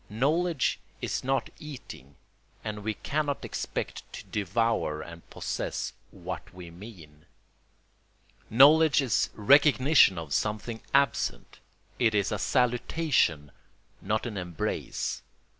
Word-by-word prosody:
Knowledge 150 +7 +1 0.2
is - - -3
not 135 +1 -1
eating, 125 - -10 0.5
and 105 -1 -5
we 110 0 -2
cannot 145 +2 -2
expect - - -4
to - - -8
devour 105 -5 0
and 85 0 -12
possess - - -4 0.2
what - - -7
we 90 -2 -10
mean. 85 -6 -13 1.2
Knowledge 145 +4 +6
is 125 -6 +1
recognition 140 - +5
of 80 -4 -5
something 110 +2 -2
absent; 140 -3 0 0.4
it 110 -3 +3
is 100 0 +1
a 105 - -2
salutation, 125 - +1 0.5
not 110 +4 -1
an 110 -4 -5
embrace. 90 -3 -3
110 Hz, 110 wpm, -28 LUFS, 95-140 Hz, 1.2 s, Knowledge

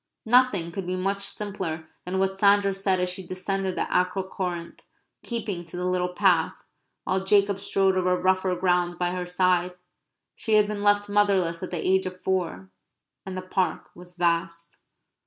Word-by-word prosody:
Nothing 220 -8 +3
could 190 0 -5
be 185 - -1
much 195 +2 -1
simpler 190 -6 -3 0.2
than 185 +1 -2
what 190 0 +1
Sandra 200 0 +4
said 190 -1 0
as 180 - +1
she 180 +1 -3
descended 185 +1 -3
the - - 0
Acro 180 +1 +1
Corinth, 180 -3 -5 0.4
keeping 210 -7 -4
to 170 +2 -9
the 180 - -2
little 180 0 0
path, 180 -4 +2 0.4
while 190 0 -1
Jacob 200 0 +3
strode 195 -1 +1
over 180 -1 +2
rougher 185 0 +1
ground 180 -1 +1
by 175 0 0
her 180 -1 -4
side. 180 0 +1 0.6
She 220 - -2
had 210 -1 +6
been 210 0 -4
left 205 0 +3
motherless 195 -5 +2
at 185 - -5
the 175 - -3
age 190 0 +3
of 185 0 -8
four; 170 - -2 0.6
and 185 -1 -5
the 185 - -5
Park 185 0 -2
was 180 0 -12
vast. 170 -1 -1
185 Hz, 175 wpm, -25 LUFS, 180-195 Hz, 0.6 s, had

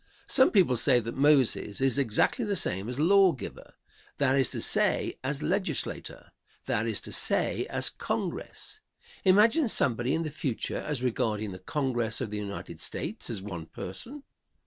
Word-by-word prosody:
Some 260 0 +5
people 175 - +3
say 125 +1 +5
that 115 0 -6
Moses 135 -7 +2
is 135 +1 +1
exactly 135 - 0
the 205 -2 -2
same 95 - 0
as 125 +2 -4
"law 190 +2 +4
giver;" 130 - -10 0.4
that 135 -2 +2
is 135 -3 +2
to - - -3
say, - - +2
as 140 +2 -2
Legislature, 185 +5 -2 0.3
that - - -1
is - - +1
to - - -5
say - - +3
as - - -1
Congress. 430 - -5 0.4
Imagine 220 - +4
somebody 125 - +3
in 165 - -2
the 155 - -5
future 135 -5 -3
as 145 -4 -4
regarding 110 -4 -2
the 95 - -9
Congress 120 0 -1
of 105 - -4
the 105 - -4
United 100 -1 -7
States - - -3
as 105 -5 -4
one 85 -6 -7
person! 245 - -7
135 Hz, 165 wpm, -27 LUFS, 110-170 Hz, 0.4 s, Some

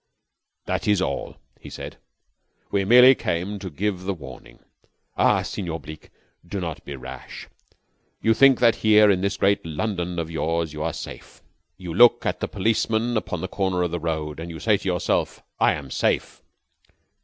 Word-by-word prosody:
"That - - -2
is 105 -2 +3
all," 95 - -3 0.2
he - - -11
said. - - -8 0.7
"We 100 -1 +1
merely 125 +5 +8
came 100 -2 -3
to 95 - -6
give 95 +3 -2
the 100 0 -1
warning. 65 -6 -12 0.6
Ah, - - +3
Senor 85 -4 -4
Bleke, 75 +1 -11 0.3
do 90 +3 -5
not 85 -4 -5
be 70 - -7
rash. 65 0 -9 0.7
You 115 - +3
think 135 +2 +5
that 115 -2 +4
here, 105 -1 +5
in 95 -2 +1
this 100 0 -1
great 100 0 +2
London 90 +1 -3
of 85 -1 -3
yours, 80 -1 -1
you 75 - -6
are 80 +1 -1
safe. - - -10 0.3
You 90 -3 -7
look 120 +6 +5
at - - -1
the - - -2
policeman 110 +3 0
upon 110 - -2
the 95 - -3
corner 95 -3 -1
of 90 - -2
the 85 - -2
road, 80 -2 -3
and 85 +1 -6
you 80 -1 -8
say 110 -2 +3
to 100 - -5
yourself 90 -2 -1 0.2
'I - - +4
am 70 -3 -7
safe.' - - -1
95 Hz, 180 wpm, -23 LUFS, 80-105 Hz, 0.7 s, merely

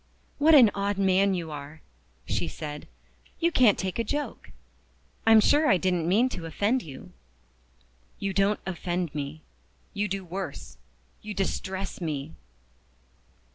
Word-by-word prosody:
"What 310 +2 +6
an 240 -7 +8
odd 200 0 -1
man 195 0 +3
you 165 -3 -4
are!" 150 +1 -8 0.4
she - - -1
said. 150 -1 -7 0.5
"You 340 0 +2
can't 240 - +5
take 190 +3 -3
a - - +2
joke. 290 +6 -4 0.8
I'm 225 -1 +8
sure 295 +7 +4
I 190 - +5
didn't 180 -2 0
mean 225 +7 +4
to 175 -9 -6
offend 205 +10 0
you." 135 - -11 1.1
"You 195 -1 -3
don't 200 +2 +2
offend 175 -2 -3
me 145 +1 -5 0.5
you 205 +1 -1
do 195 -1 -4
worse, 190 +3 -6 0.4
you 210 -1 -7
distress 190 0 -3
me." 155 -2 -4
190 Hz, 135 wpm, -27 LUFS, 165-210 Hz, 1.1 s, an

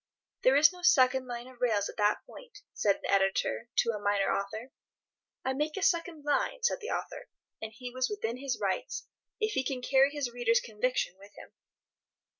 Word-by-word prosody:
"There 260 - +5
is 305 +5 +6
no 360 - -12
second 260 -7 +4
line 240 0 -6
of 255 -1 -16
rails 215 -5 +2
at - - -9
that 210 0 +1
point," 465 -4 -14
said 200 -2 +2
an - - -2
editor 195 - +1
to 230 - +3
a 210 - -4
minor 205 -1 +1
author. 215 +6 -5 0.7
"I 265 - +1
make 300 +4 -2
a 390 - -2
second 335 -4 +1
line," 465 +11 0
said 485 - +2
the 440 - -5
author; - - -4 0.3
and 220 0 -5
he 245 +2 -8
was 255 0 -1
within 250 - -3
his 270 -1 -3
rights, - - -2 0.3
if 430 -1 0
he 265 - +1
can 255 -1 -3
carry 270 +1 +4
his 285 -4 -3
readers' 235 -1 +3
conviction 220 -3 -2
with 200 +1 -15
him. - - -12
255 Hz, 195 wpm, -30 LUFS, 220-300 Hz, 0.7 s, is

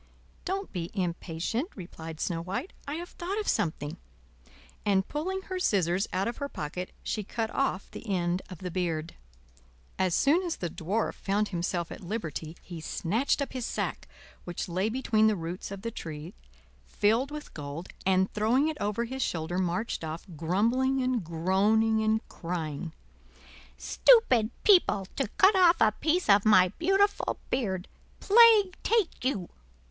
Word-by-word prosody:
"Don't 390 +2 -3
be 175 -2 -3
impatient," 180 - -2
replied 165 -4 -8
Snow 165 -2 -1
White; 200 - -4
"I 290 - -3
have 345 +2 -6
thought 380 +5 -4
of 420 - -4
something;" 155 -7 -1 0.9
and 195 -2 +2
pulling 375 +6 -3
her 370 -1 -4
scissors 190 - +1
out 190 +3 0
of 235 - -3
her 280 -1 -4
pocket 180 - -5
she 215 - -2
cut 225 +2 -3
off 270 -8 -1
the - - -9
end 180 -1 0
of 185 - -8
the 180 +1 -6
beard. 165 -3 -2 0.9
As 185 -2 +2
soon 305 +6 +4
as 350 -3 -2
the 175 -3 -4
Dwarf 200 +9 -1
found 205 +2 -1
himself 175 -1 -2
at - - -8
liberty, 170 -5 -5
he 170 -3 -8
snatched 225 - 0
up 275 - -8
his 255 -3 -3
sack, - - -3 0.4
which 175 -1 -4
lay 185 +4 0
between 220 -3 +2
the 215 - +3
roots 170 +1 -5
of 200 0 -8
the 230 - -3
tree, 160 -3 -7 0.5
filled 225 +6 +1
with 300 0 -8
gold, 145 +3 -6 0.2
and 190 0 +2
throwing 240 +8 +2
it 310 - -4
over 210 +3 0
his 265 +3 -5
shoulder 175 -3 -1
marched 180 +3 -1
off, 160 +1 -5
grumbling 230 - +1
and 255 -4 0
groaning 200 +7 +2
and 220 0 +1
crying: 165 -2 -4 0.9
"Stupid 260 - +4
people! 350 - +5
to 270 - 0
cut 395 +1 +6
off 355 -2 +6
a 220 - +5
piece 320 - 0
of 200 -1 +6
my 195 -4 +6
beautiful 395 +2 +2
beard. 190 -7 -1 0.3
Plague 425 -3 +6
take 440 - +1
you!" 210 -9 -1
205 Hz, 160 wpm, -29 LUFS, 175-265 Hz, 0.9 s, cut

